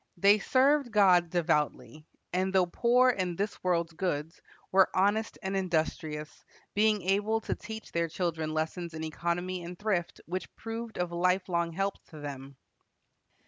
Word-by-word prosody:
They 200 +4 +5
served 270 +4 +3
God 185 -5 +5
devoutly, 155 -2 -1 0.3
and 185 +1 +1
though 190 -1 +4
poor 245 +7 +4
in 185 -6 -2
this 205 +4 -3
world's 170 -2 +1
goods, 160 -2 -3 0.3
were 190 0 +5
honest 205 +4 +1
and 190 +1 -2
industrious, 160 -4 -2 0.3
being 210 -2 +3
able 205 +4 +1
to - - -2
teach 220 0 -8
their 170 0 0
children 165 -2 -2
lessons 160 +1 -3
in 160 - -5
economy 175 +3 -2
and 175 +1 -7
thrift 190 -5 -1
which 185 +2 -4
proved 225 0 -6
of 180 -1 -1
lifelong 175 -1 +1
help 195 +3 -2
to 155 - -12
them. 140 -1 -7
180 Hz, 145 wpm, -30 LUFS, 165-200 Hz, 0.3 s, They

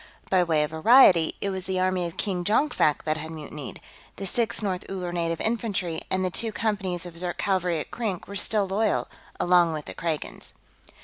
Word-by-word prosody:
By 185 -2 +5
way 160 -3 +2
of 150 - -3
variety, 170 -1 +6
it 200 - -1
was 190 -1 -4
the 190 -1 -1
army 185 -1 +1
of 170 - -10
King 185 -4 -2
Jonkvank 210 - +2
that 155 0 -1
had 160 0 -6
mutinied; 150 -3 -8 0.4
the 195 - -6
Sixth 215 0 +1
North 185 -3 -2
Uller 180 -2 -4
Native 165 -1 -1
Infantry 205 -8 -1
and 185 0 0
the 185 - -1
two 225 +6 +1
companies 195 -5 -2
of 170 -1 -8
Zirk 175 -1 -2
cavalry 180 -4 0
at - - -6
Krink 210 -8 -3
were 200 - -8
still 205 0 +1
loyal, 205 +2 0 0.3
along 175 -2 +4
with 150 -1 -5
the - - -7
Kragans. 160 -3 -4
180 Hz, 195 wpm, -26 LUFS, 165-200 Hz, 0.4 s, variety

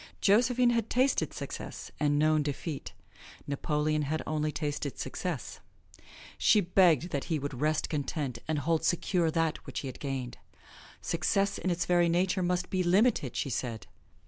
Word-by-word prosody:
Josephine 240 +4 +4
had 230 -2 0
tasted 260 +3 +2
success - - -7
and 145 -1 +2
known 155 +1 +3
defeat. 145 +1 -4 0.5
Napoleon 150 +2 0
had 155 +2 -2
only 155 -1 -1
tasted 145 -3 -3
success. - - -4 0.8
She 210 - +5
begged 175 -3 +3
that 140 - -2
he 160 - 0
would 140 -2 -5
rest 155 0 +1
content 140 -4 -3
and 155 -1 0
hold 160 +3 0
secure 175 0 +1
that 165 -1 0
which - - -4
he 135 - -5
had 130 - -8
gained. 130 -4 -4 0.6
Success 195 +4 0
in 185 - -1
its 175 -1 0
very 175 -1 +3
nature 180 +2 +1
must 180 0 -1
be 185 - +1
limited, 185 - +2
she 135 - -2
said. 115 -2 -3
155 Hz, 155 wpm, -30 LUFS, 145-180 Hz, 0.8 s, She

